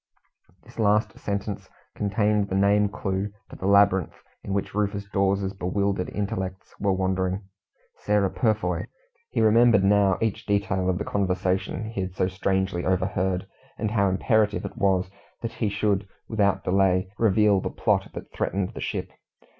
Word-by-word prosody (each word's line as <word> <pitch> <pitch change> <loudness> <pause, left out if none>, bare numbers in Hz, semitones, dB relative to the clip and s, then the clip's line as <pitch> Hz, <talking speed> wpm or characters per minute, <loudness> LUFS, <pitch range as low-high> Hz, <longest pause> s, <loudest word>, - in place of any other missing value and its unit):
This - - -15
last 105 0 +2
sentence 100 0 -4 0.2
contained 105 0 +1
the 95 - -1
name 100 +1 +3
clue 95 0 -3 0.2
to - - -9
the 95 - -4
labyrinth 100 -3 +3 0.2
in - - -6
which 100 0 -2
Rufus 100 0 -1
Dawes's 100 -1 0
bewildered 100 0 -1
intellects 95 -3 -4
were 100 - +1
wandering. 95 +1 0 0.5
"Sarah 105 -2 +1
Purfoy!" 110 -2 0 0.4
He - - 0
remembered 110 -2 +5
now 100 -1 +4
each 110 -2 -2
detail 100 -2 +1
of 90 - +1
the - - -3
conversation 95 +2 -1
he 100 - -3
had 95 0 -5
so 90 - +1
strangely 95 -1 -1
overheard, 95 0 0 0.3
and 105 - -2
how 100 -3 +2
imperative 105 +2 +1
it 100 - -6
was 95 -1 +1 0.3
that 115 - -2
he 110 -3 -1
should, 100 -1 0 0.2
without 100 -3 +1
delay, 95 0 +2
reveal 105 -2 +4
the - - -3
plot - - 0
that - - -8
threatened 95 -1 -2
the - - -7
ship. - - -3
100 Hz, 155 wpm, -25 LUFS, 95-105 Hz, 0.5 s, remembered